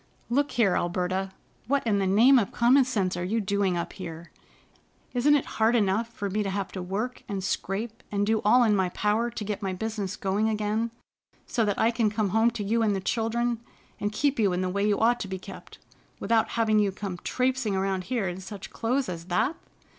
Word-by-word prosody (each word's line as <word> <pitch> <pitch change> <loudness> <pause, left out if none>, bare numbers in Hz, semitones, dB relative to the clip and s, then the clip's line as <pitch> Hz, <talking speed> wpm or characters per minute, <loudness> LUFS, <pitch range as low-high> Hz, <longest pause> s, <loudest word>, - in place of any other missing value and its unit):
"Look 285 +4 +1
here, 215 -6 +3
Alberta, 185 +2 -1 0.4
what 280 +1 +1
in 205 -3 +2
the 195 - +1
name 240 +8 +6
of 205 - -2
common 255 +3 +4
sense 200 -8 0
are 175 - -3
you 215 +6 0
doing 200 -3 0
up 170 - -4
here? 170 -2 -8 0.8
Isn't 275 +4 +4
it 285 - +1 0.2
hard 225 +2 +4
enough 215 +1 +2
for 205 -3 -4
me 205 +2 -1
to 200 - -1
have 195 -1 -3
to 185 - -5
work 210 +8 -3
and 195 -2 -3
scrape 215 +4 -3
and 205 0 +1
do 220 +1 +1
all 245 +4 +5
in 215 -3 +3
my 190 -2 +1
power 210 +5 0
to 230 -2 -6
get 205 0 -4
my 190 -2 -2
business 210 0 -3
going 205 +3 0
again, 215 +1 -1 0.6
so 235 - 0
that 205 -1 0
I 225 - +3
can 230 -2 +1
come 210 -1 -1
home 225 +4 +3
to 235 -3 -5
you 225 +3 +1
and 210 -3 +2
the - - -1
children 235 +3 -1 0.4
and 205 - -1
keep 280 +4 0
you 200 -4 +3
in 180 - -1
the 185 - -1
way 200 +2 -1
you 205 - +2
ought 240 +2 +3
to 200 - -4
be 190 0 -4
kept, 185 - -11 0.4
without 225 +1 +2
having 220 -2 +3
you 205 -2 +2
come 190 -2 -6
traipsing 255 -5 0
around 190 -1 -1
here 235 -4 -1
in 175 +2 -5
such 195 +1 -8
clothes 255 +4 -1
as 170 -2 -6
that? 180 - 0
210 Hz, 220 wpm, -27 LUFS, 190-230 Hz, 0.8 s, name